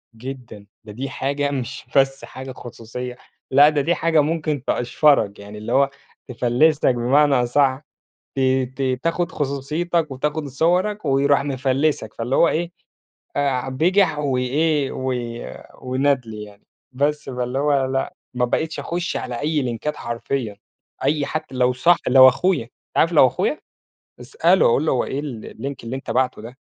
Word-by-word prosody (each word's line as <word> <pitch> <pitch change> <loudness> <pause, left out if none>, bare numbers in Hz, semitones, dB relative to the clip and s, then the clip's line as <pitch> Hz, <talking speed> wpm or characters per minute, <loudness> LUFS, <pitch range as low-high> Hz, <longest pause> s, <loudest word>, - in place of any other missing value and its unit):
جدًا، 120 -4 -9 0.2
ده 110 - -10
دي 130 +6 -5
حاجة 140 +2 -2
مش 130 -2 -5
بس 135 0 +2
حاجة 130 0 -8
خصوصية، 125 0 -8 0.3
لأ 140 +3 +7
ده 150 -2 0
دي 170 +5 +1
حاجة 160 -2 +3
ممكن 155 -3 -1
تقشفرك، 120 -5 +2
يعني 100 +1 -10
اللي 105 - -6
هو 140 0 +4 0.4
تفلّسك 125 +5 +2
بمعنى 135 +4 +3
أصَح، 130 +2 +2 0.6
ت - - +1 0.4
ت 130 -2 -1
تاخد 170 0 0
خصوصيتك 150 +4 -2
وتاخد 150 +3 -2
صوَرك 180 +9 0
ويروح 140 0 +3
مفلّسك، 135 -3 -1
فاللي 120 +3 -2
هو 170 - +5
إيه، 170 +2 -1 0.7
آآ 135 -2 0
بجح 165 +4 +2
و 140 -3 0
إيه 145 +3 +1
و 130 0 -2 0.7
وندل 130 -3 0
يعني، 105 -1 -10 0.3
بس 145 +3 0
فاللي 125 0 -3
هو 140 -1 +2
لأ، 135 0 -2 0.2
ما 125 0 +1
بقيتش 160 +6 -1
أخش 175 +1 -3
على 120 0 -4
أي 150 -1 0
لينكات 130 +5 -3
حرفيًا، 120 -2 -4 0.5
أي 145 +1 +1
حتّى 155 -4 -5
لو 125 0 +2
صاح 170 +8 +4
لو 130 0 +9
أخويا، 140 -2 +1 0.3
عارف 165 +2 +3
لو 140 -5 +7
أخويا، - - -1 0.6
اسأله 170 +9 +3
أقول 135 +6 +2
له: - - +2
"هو 130 - +1
إيه 140 - -3
ال 130 -7 -7
الLink 140 +5 -5
اللي 120 +3 -4
أنت 135 - -7
باعته 130 -3 0
ده؟" 120 +4 -11
135 Hz, 155 wpm, -21 LUFS, 125-150 Hz, 0.7 s, لو